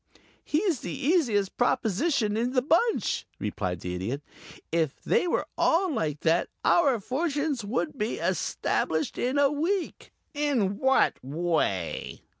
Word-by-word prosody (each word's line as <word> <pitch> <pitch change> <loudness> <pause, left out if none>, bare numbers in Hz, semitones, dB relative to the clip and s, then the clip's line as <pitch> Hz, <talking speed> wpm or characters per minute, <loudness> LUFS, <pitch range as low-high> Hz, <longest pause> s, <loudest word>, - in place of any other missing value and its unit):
"He's 330 - 0
the 170 - -5
easiest 245 - +1
proposition 225 - +1
in 240 +3 0
the 255 -2 +2
bunch," 345 - +1
replied 90 -3 -3
the 90 - -4
Idiot. 115 +11 -3 0.5
"If 160 -4 0
they - - +2
were - - 0
all 345 0 +3
like 150 - -2
that 165 +1 +2 0.2
our 280 -9 +4
fortunes 285 - -1
would 200 -7 -2
be 215 +2 -1
established 295 - -1
in 255 +3 0
a 285 -1 +4
week." 335 +6 -2 0.2
"In 260 -10 0
what 265 - +2
way?" 145 - -2
245 Hz, 130 wpm, -27 LUFS, -, 0.5 s, our